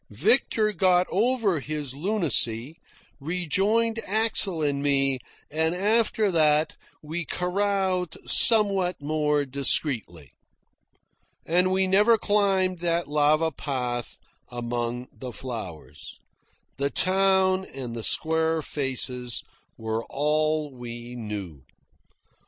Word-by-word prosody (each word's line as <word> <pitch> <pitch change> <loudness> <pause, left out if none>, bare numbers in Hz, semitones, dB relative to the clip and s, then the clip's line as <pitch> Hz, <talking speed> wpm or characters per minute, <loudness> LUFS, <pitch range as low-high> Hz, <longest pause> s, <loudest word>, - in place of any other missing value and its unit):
Victor 215 - +2
got 180 0 +3
over 215 - +1
his 145 -2 -5
lunacy, 145 - 0 0.4
rejoined 195 +9 0
Axel 205 -6 0
and 140 -1 -1
me, 135 -2 +2 0.3
and 160 +2 0
after 210 +1 +2
that 155 -2 +2 0.3
we 160 +3 -4
caroused 185 -1 -1
somewhat 200 -5 +5
more 150 0 0
discreetly. 130 - -1 1.1
And 180 +3 +2
we 190 0 +2
never 205 +5 +4
climbed 195 -4 +1
that 170 0 -1
lava 150 +2 +2
path 125 -4 -4 0.3
among 120 0 -4
the 130 -1 -8
flowers. 110 -11 -8 0.6
The 140 +1 0
town 190 +1 +2
and 125 -6 -8
the 115 - -5
square 160 +5 0
faces 125 -4 -2 0.3
were 110 0 -3
all 155 +1 0
we 120 -1 -9
saw. 105 -9 -6
155 Hz, 100 wpm, -25 LUFS, 130-190 Hz, 1.1 s, somewhat